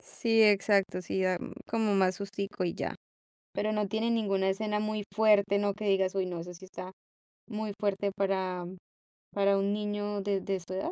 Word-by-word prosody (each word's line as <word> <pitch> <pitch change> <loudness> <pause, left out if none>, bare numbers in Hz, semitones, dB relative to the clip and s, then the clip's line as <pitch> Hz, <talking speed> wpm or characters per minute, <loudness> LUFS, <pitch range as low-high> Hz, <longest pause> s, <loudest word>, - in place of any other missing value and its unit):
Sí, 225 - +2
exacto, 200 -2 +4
sí 190 +2 -1
da, 185 -1 +2
mm, - - -7
como 220 -3 +1
más 185 -1 +3
sustico 200 -1 -4
y 170 - -1
ya. - - -3 0.6
Pero 215 +1 0
no 210 -1 0
tiene 220 +3 0
ninguna 195 -4 +1
escena 210 +1 0
muy 215 -1 -2
fuerte, 205 -2 +4
¿no? 205 -1 +1
que 210 +1 -6
digas: 195 -1 +2
"Uy, 190 - +1
no, 175 -2 -4
esa 180 +2 -7
sí 190 +2 -12
está 185 0 -8 0.6
muy 215 -2 -3
fuerte 200 -1 0
para 190 -2 0 0.7
para 200 0 +3
un 200 +1 +1
niño 205 -1 -2
de 195 -1 0
de 195 -1 -1
su 175 +1 -8
edad". 190 - -2
200 Hz, 190 wpm, -30 LUFS, 190-210 Hz, 0.7 s, exacto